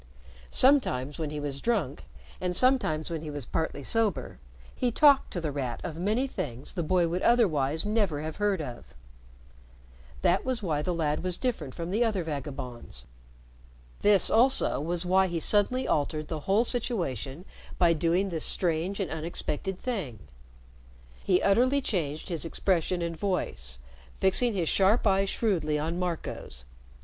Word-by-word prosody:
Sometimes 165 - +2
when 155 -2 -2
he 150 0 -4
was 140 -1 -4
drunk, 180 - -1 0.4
and 180 -1 -1
sometimes 175 -11 +2
when 165 -2 -3
he 155 - -6
was 145 -4 -5
partly 150 -1 -3
sober, 215 - 0 0.3
he 250 -1 0
talked 280 +2 +5
to 175 - -3
The 160 -3 -2
Rat 130 -4 -3
of 165 -2 -5
many 215 +8 +1
things 135 - -5
the 180 - -2
boy 175 +1 +2
would 175 +3 -2
otherwise 160 - +2
never 205 -8 +1
have 155 0 -5
heard 205 -4 +1
of. 120 - -9 1.3
That 180 +1 +3
was 255 -4 -2
why 155 -5 0
the 180 - -1
lad 155 -3 -1
was 180 -1 -2
different 240 - -3
from 170 +1 -4
the 220 +5 +2
other 210 -6 0
vagabonds. 135 - -6 1.0
This, 205 -2 +4
also, 250 +4 +3
was 170 +3 -2
why 190 +1 +4
he 170 -2 -2
suddenly 215 +9 +1
altered 150 +1 -1
the 160 - -3
whole 205 +4 +4
situation 180 - -2 0.3
by 170 -2 +4
doing 170 +5 +1
this 165 -4 -2
strange 175 +3 0
and 195 - -2
unexpected 165 +3 -3
thing. 190 - -4 1.1
He 180 -2 +2
utterly 250 +7 +4
changed 160 - -2
his 165 -4 -2
expression 175 0 0
and 170 0 -3
voice, 160 - -2 0.4
fixing 205 +4 +3
his 175 -4 0
sharp 200 +8 +3
eyes 195 -1 +3
shrewdly 165 -11 0
on 165 +4 -2
Marco's. 165 - -4
175 Hz, 155 wpm, -28 LUFS, 150-205 Hz, 1.3 s, talked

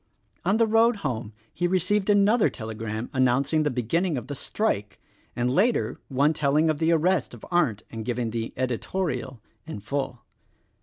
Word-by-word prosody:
On 195 +5 +2
the 230 - +4
road 225 +2 +4
home 115 -5 -2 0.2
he 175 - 0
received 190 +3 +1
another 205 +2 +4
telegram 110 0 -5
announcing 135 +4 +2
the 150 - +1
beginning 145 - 0
of 120 - -5
the 145 - -5
strike, 105 - -2 0.4
and 120 0 0
later 195 - +1
one 140 +3 +2
telling 150 +2 +2
of 150 - -4
the 165 +1 +2
arrest 165 -4 +1
of 115 - -12
Arndt 135 - +1
and 115 -1 -5
giving 120 0 -2
the 115 0 -3
"editorial" 130 - -2 0.3
in 160 - -6
full. 125 +3 -4
140 Hz, 160 wpm, -26 LUFS, 120-180 Hz, 0.4 s, the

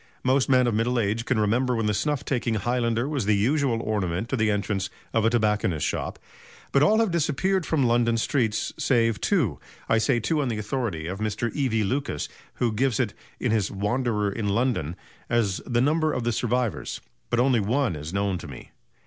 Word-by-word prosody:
Most 130 +1 +2
men 130 -1 +5
of 120 - +1
middle 115 +3 +1
age 110 +2 0
can 130 -4 +1
remember 120 +4 +2
when 115 -1 0
the 105 - +1
snuff 145 +5 -1
taking 120 -4 0
highlander 120 +2 0
was 140 -9 -2
the 105 - +4
usual 125 +3 +1
ornament 100 0 -1
to - - 0
the 110 -3 +2
entrance 100 -1 -1 0.2
of 115 -1 +2
a - - +5
tobacconist's 105 - +1
shop; - - -3 0.5
but 140 - +3
all 185 +9 +5
have 225 -4 +2
disappeared 170 +3 0
from 145 -5 +2
London 115 -1 +2
streets 115 -2 0
save 115 -4 +2
two 155 - +1 0.3
I 115 - +3
say 110 +2 +2
two 150 +7 0
on 140 - -1
the 115 -3 -2
authority 105 -7 -3
of 95 +4 -4
Mr. 110 +2 -2
E.V. 125 -7 +1
Lucas, 125 - -2 0.3
who 120 -2 0
gives 125 +1 +1
it 115 -6 0 0.3
(in 125 - 0
his 110 -3 +1
"Wanderer 105 0 0
in 105 0 -2
London") 100 - 0 0.3
as 110 -5 +1
the 120 -1 +1
number 155 +3 +2
of 125 - -2
the 120 - +1
survivors; 120 -1 -1 0.3
but 120 - +1
only 125 -1 +4
one 115 - +1
is 75 +2 -6
known 100 -1 -1
to - - -9
me. 70 -4 -11
115 Hz, 200 wpm, -25 LUFS, 105-130 Hz, 0.5 s, men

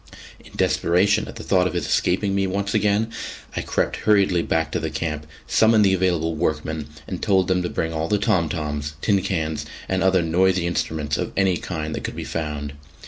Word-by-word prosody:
In - - -17
desperation 100 +5 +2
at - - -9
the 115 - -7
thought 90 -2 +3
of - - -4
his 85 - -1
escaping 100 +2 +1
me 95 0 +1
once 100 +1 -2
again, 105 +1 +2 0.4
I - - -1
crept - - -1
hurriedly 100 -5 +3
back 80 -2 0
to - - -1
the 80 - -2
camp, 75 -1 -3 0.2
summoned 110 -1 +4
the 95 - +4
available 85 -3 +1
workmen 75 -1 -2 0.2
and 95 - -5
told 95 -4 +3
them 95 -1 +2
to 90 - -2
bring 80 0 -2
all 80 0 -1
the 105 - +2
tom 90 -5 +1
toms, 75 -2 -3
tin 100 -3 +3
cans, 80 -5 -2 0.2
and 95 0 0
other 95 -1 +3
noisy 90 +2 +2
instruments 80 -3 -1
of - - -3
any 95 -2 +3
kind 80 -3 -4
that - - -4
could - - -4
be - - -4
found. 75 -3 -4
90 Hz, 200 wpm, -23 LUFS, 80-95 Hz, 0.4 s, summoned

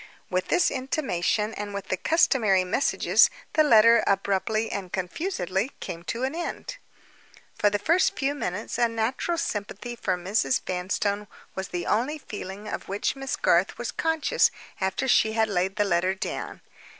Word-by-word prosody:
With 185 0 0
this 355 - +3
intimation, 225 - -1
and 205 -1 -5
with 200 - -6
the - - +1
customary 215 - +3
messages, 205 +11 +3 0.2
the 310 - +5
letter, 230 -4 +6
abruptly 200 +3 0
and 190 -3 -5
confusedly, 190 - -2
came 165 - -6
to 230 +9 -3
an 265 +2 -1
end. 345 +8 -5 0.8
For 205 - +2
the 205 - 0
first 335 - +2
few 275 +1 0
minutes, 215 -6 -4
a 240 - +4
natural 230 +9 -1
sympathy 225 -4 -4
for 185 -5 -1
Mrs. 180 - +1
Vanstone 200 +3 -1 0.3
was 190 0 -4
the 175 -1 -4
only 255 +8 0
feeling 205 -5 -8
of - - -5
which 200 +6 -1
Miss 270 -1 -3
Garth 175 +4 +2
was 240 -1 -3
conscious 325 +9 +2 0.3
after 190 +7 -1
she 220 -3 +4
had 220 0 +2
laid 190 0 0
the 205 -1 +2
letter 185 0 +1
down. 190 - -5
210 Hz, 160 wpm, -26 LUFS, 190-260 Hz, 0.8 s, letter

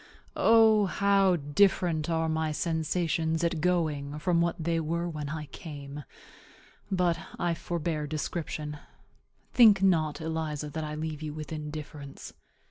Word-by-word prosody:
O, 220 -2 +5
how 195 -1 +3
different 160 +1 +2
are 165 -1 +1
my 160 0 0
sensations 160 0 0
at 165 -2 0
going 155 -5 0
from 170 +1 +1
what 170 0 +1
they 165 0 0
were 170 +2 -1
when 150 -4 -5
I 155 0 -4
came! 145 -1 -9 0.8
But 180 -3 +1 0.2
I 175 -1 0
forbear 165 -2 -3
description. 150 -1 -4 0.7
Think 210 -6 +7
not, 160 -5 +2
Eliza, 155 -2 -3
that 160 +1 -4
I 150 0 -4
leave 155 -1 -4
you 150 -1 -5
with 155 0 -7
indifference. 150 -2 -7
160 Hz, 130 wpm, -29 LUFS, 150-175 Hz, 0.8 s, Think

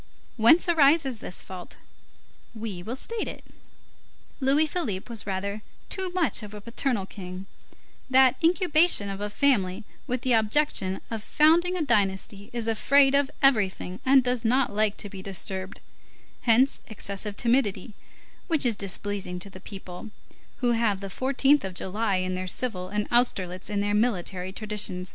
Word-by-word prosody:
Whence 245 +11 +5
arises 285 -6 +3
this 180 - -6
fault? 185 -2 -9 0.8
We 215 -5 -6
will 225 +7 -5
state 455 +11 -4
it. - - -8 0.9
Louis 280 +3 +3
Philippe 260 - -3
was 220 -3 -5
rather 200 +2 -3 0.3
too 375 -1 -2
much 355 -7 0
of 210 0 -9
a - - -7
paternal 230 -1 -2
king; 185 -1 -9 0.6
that 260 -1 +5
incubation 335 - +4
of 195 0 -6
a 210 - -2
family 205 -6 +1 0.2
with 250 0 -2
the 255 -1 +1
object 225 +7 +2 0.3
of 225 -2 -3
founding 340 +7 +3
a 335 - 0
dynasty 200 -4 -1
is 235 -2 -3
afraid 270 +5 +4
of 280 -1 +3
everything 195 -7 +2
and 265 0 +5
does 250 -1 -1
not 250 +2 +1
like 210 -1 +1
to - - -5
be 195 -1 -9
disturbed; 190 0 -4 0.7
hence 255 +4 +4
excessive 200 -1 -5
timidity, 230 -4 0 0.5
which 320 -6 +1
is 235 -3 +2
displeasing 200 -1 -3
to 195 +3 -5
the 185 - -11
people, 190 +1 -9 0.5
who 245 -1 +2
have 225 -4 +1
the 195 - -6
14th 270 +6 +2
of 190 -2 -5
July 200 +2 -1
in 185 0 -1
their 185 0 -4
civil 185 -2 -2
and 210 +1 -2
Austerlitz 190 -7 +1
in 205 -1 -1
their 205 0 0
military 190 -4 -1
tradition. 205 -3 -1
215 Hz, 155 wpm, -26 LUFS, 195-265 Hz, 0.9 s, Whence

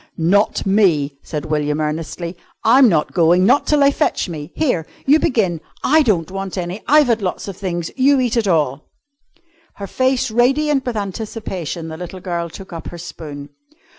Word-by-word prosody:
"Not 195 +6 +2
me," 165 -9 +2
said 150 -2 -5
William 150 -1 -1
earnestly. 160 +3 -3 0.3
"I'm 250 +2 +6
not 155 -5 0
going 175 +1 +4
not 255 +7 +3
till 300 -1 +3
they 280 0 +5
fetch 295 -6 0
me. 155 -4 -7
Here! 250 - 0 0.2
you 295 +3 +5
begin. 190 - 0 0.2
I 315 +3 +4
don't 185 - 0
want 195 0 -5
any. 180 +3 -4
I've 300 +1 +6
had 230 -3 +1
lots 185 +1 -3
of 195 - -6
things. 175 -3 -4
You 275 +1 +4
eat 245 -2 0
it 230 -3 +1
all." 150 -5 0 0.9
Her 200 - -6
face 255 +3 0
radiant 270 +4 +2
with 235 -3 -2
anticipation, 195 -5 -5
the 160 - -7
little 180 +2 -7
girl 170 -2 -3
took 190 +2 -11
up 165 -2 -7
her 175 - -8
spoon. 150 -4 -8
190 Hz, 175 wpm, -19 LUFS, 165-240 Hz, 0.9 s, I'm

